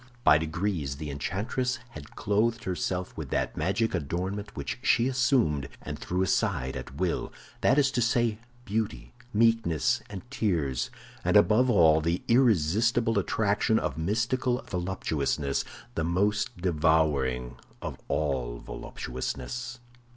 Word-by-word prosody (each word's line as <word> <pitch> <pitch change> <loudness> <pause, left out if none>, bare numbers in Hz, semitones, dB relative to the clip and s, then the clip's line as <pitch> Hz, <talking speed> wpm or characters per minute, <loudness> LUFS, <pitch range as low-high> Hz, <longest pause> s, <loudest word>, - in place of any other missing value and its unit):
By 75 - +6
degrees 80 -3 -2
the 75 0 -5
enchantress 110 - -2
had 75 -1 -11
clothed 115 +3 +1
herself 90 0 -2
with - - -6
that - - -1
magic 105 +4 0
adornment 95 +6 -3
which 70 - -4
she 120 0 +3
assumed 120 - +2
and - - -6
threw 90 +1 -1
aside 80 - 0
at 65 +1 -7
will; 90 +2 -1 0.3
that 130 - +4
is 135 -2 +4
to 120 - 0
say, 120 -2 +2 0.3
beauty, 110 0 -3 0.2
meekness, 115 0 +2
and 100 -2 -7
tears—and 80 - -1
above 125 +4 +5
all, 80 -8 +5
the 85 +2 -1
irresistible 115 - +3
attraction 105 +3 +1
of - - -1
mystical 115 +9 0
voluptuousness, 80 -6 -1 0.3
the 80 - -1
most 105 +7 0
devouring 75 -8 +1 0.2
of - - -6
all 65 -5 -1
voluptuousness. 120 - -5
95 Hz, 120 wpm, -28 LUFS, 75-115 Hz, 0.3 s, By